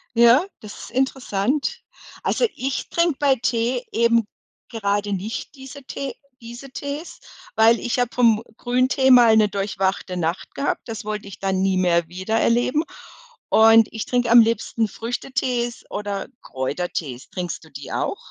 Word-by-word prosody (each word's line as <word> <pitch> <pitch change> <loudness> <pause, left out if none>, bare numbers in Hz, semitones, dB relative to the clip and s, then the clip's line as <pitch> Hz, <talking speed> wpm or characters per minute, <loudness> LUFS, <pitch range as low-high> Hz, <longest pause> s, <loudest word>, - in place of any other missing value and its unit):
Ja, 235 +8 +6
das 210 -1 -10
ist - - -10
interessant. 265 - -1 0.4
Also, 485 - +1
ich 265 +2 -3
trinke 335 -3 +1
bei 280 -2 +4
Tee 240 +1 -1
eben 230 -1 +3 0.4
gerade 205 -2 -1
nicht 205 +9 -5
diese 270 +1 -11
Tee 275 +1 -5 0.3
diese 240 +3 -10
Tees, 285 +5 -6 0.4
weil 225 +1 +5
ich 245 +1 -2
habe 245 -1 +1
vom 230 -3 +4 0.2
Grüntee 255 +2 +2
mal 235 -3 +7
'ne 215 - +5
durchwachte 195 -2 -2
Nacht 170 +1 -3
gehabt. 280 - -1
Das 225 -2 -6
wollte 210 -1 -4
ich 200 - -10
dann 190 -1 0
nie 190 -1 +1
mehr 170 -2 +2
wieder 185 +5 -3
erleben 245 +6 +2 0.7
und 225 0 +6
ich 220 - -4
trinke 245 -2 0
am 235 - +9
liebsten 225 0 0
Früchtetees 240 +1 -3
oder 205 -1 -4
Kräutertees. 135 -1 -4
Trinkst 175 -2 -5
du 160 - -16
die 140 -1 -9
auch? - - -2
230 Hz, 150 wpm, -22 LUFS, 200-255 Hz, 0.7 s, am